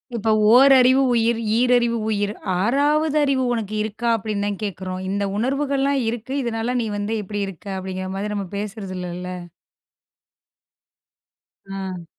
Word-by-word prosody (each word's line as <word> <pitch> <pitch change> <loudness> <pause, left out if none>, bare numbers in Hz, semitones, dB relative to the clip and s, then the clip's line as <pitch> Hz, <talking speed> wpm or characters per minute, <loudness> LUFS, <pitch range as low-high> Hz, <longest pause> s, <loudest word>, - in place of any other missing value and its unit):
இப்ப 220 0 -1 0.2
ஓரறிவு 265 0 +6
உயிர், 230 0 +2 0.2
ஈரறிவு 240 -1 +3
உயிர் 205 -1 0 0.3
6வது 295 +6 +2
அறிவு 270 -2 +1
உனக்கு 215 -2 -3
இருக்கா 220 +2 -3
அப்படின்னுதான் 205 -2 -3
கேக்குறோம். 185 -1 -4
இந்த 200 +1 -1
உணர்வுகள் 275 +3 0
எல்லாம் 275 0 +2
இருக்கு 240 +3 -5
இதனால 235 +1 -2
நீ 225 - -2
வந்து 205 +2 -2
இப்படி 205 +1 -4
இருக்க 195 0 -10
அப்படிங்கிற 185 0 -5
மாதிரி 210 +2 -3
நம்ம 200 -2 -3
பேசுறது 200 -2 -5
இல்லல்ல. 180 0 -5 2.4
ஆ. 190 -3 -5
220 Hz, 130 wpm, -22 LUFS, 195-250 Hz, 2.4 s, ஓரறிவு